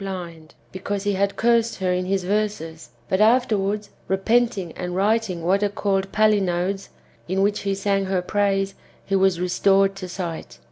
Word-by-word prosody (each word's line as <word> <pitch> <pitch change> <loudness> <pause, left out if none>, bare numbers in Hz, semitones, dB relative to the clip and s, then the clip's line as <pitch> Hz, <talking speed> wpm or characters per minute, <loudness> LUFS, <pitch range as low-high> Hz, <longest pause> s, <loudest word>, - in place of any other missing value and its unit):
blind, 170 -5 -7 0.2
because 195 +1 -4
he 205 0 0
had 200 +1 0
cursed 230 0 +2
her 185 -1 0
in 180 0 -1
his 190 0 0
verses, 185 - -2 0.2
but 190 - +1
afterwards, 210 -3 +2 0.2
repenting 195 -1 +1
and 180 +1 -5
writing 200 -3 0
what 190 +4 +2
are 205 - +2
called 195 -1 -1
palinodes^ 195 -3 +1 0.4
in 190 +2 -1
which 205 +1 +1
he 195 -1 -1
sang 195 0 0
her 190 -1 0
praise, 195 0 0 0.3
he 195 - 0
was 190 -2 +3
restored 195 +2 +2
to 185 -2 -7
sight. 175 -3 -6
195 Hz, 160 wpm, -23 LUFS, 185-205 Hz, 0.4 s, was